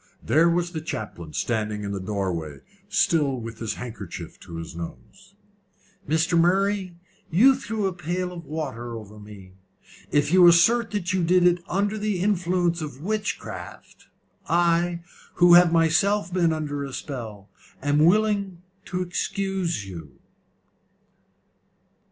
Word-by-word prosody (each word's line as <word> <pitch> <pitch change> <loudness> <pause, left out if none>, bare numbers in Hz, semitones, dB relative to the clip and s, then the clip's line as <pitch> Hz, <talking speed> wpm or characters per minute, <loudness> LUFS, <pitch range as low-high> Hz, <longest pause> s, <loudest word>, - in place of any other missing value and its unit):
There 165 +3 +4
was 175 0 0
the 160 -3 -4
chaplain 105 - -6
standing 105 +2 -2
in 100 - -4
the 100 - -3
doorway 95 -7 -3 0.3
still 150 -10 +2
with 115 -1 -8
his 110 -2 -3
handkerchief 120 -4 -8
to 85 - -11
his 80 0 -7
nose. 185 - -10 0.7
"Mr. 160 +2 +2
Murray, 190 +1 +1 0.3
you 230 +12 +6
threw 225 -5 -3
a 190 - 0
pail 180 +1 -3
of 170 -1 -8
water 130 -6 -5
over 105 -1 -11
me. 100 -3 -13 0.6
If 145 +2 +1
you 180 -1 +8
assert 225 +8 +5
that 195 -4 -2
you 185 -2 +1
did 180 +1 +4
it 175 0 +3
under 205 +3 0
the 210 -3 -1
influence 180 -3 +1
of 145 -4 -6
witchcraft, 215 +2 -5 0.4
I, 170 0 +2 0.3
who 175 0 +6
have 175 -1 +7
myself 170 +3 +2
been 175 -3 +2
under 150 -2 -3
a 135 -1 -7
spell, 110 -9 -7 0.3
am 145 +1 +2
willing 200 -1 +2 0.2
to 180 0 -2
excuse 180 - -2
you." 80 -8 -10
170 Hz, 135 wpm, -24 LUFS, 120-185 Hz, 0.7 s, you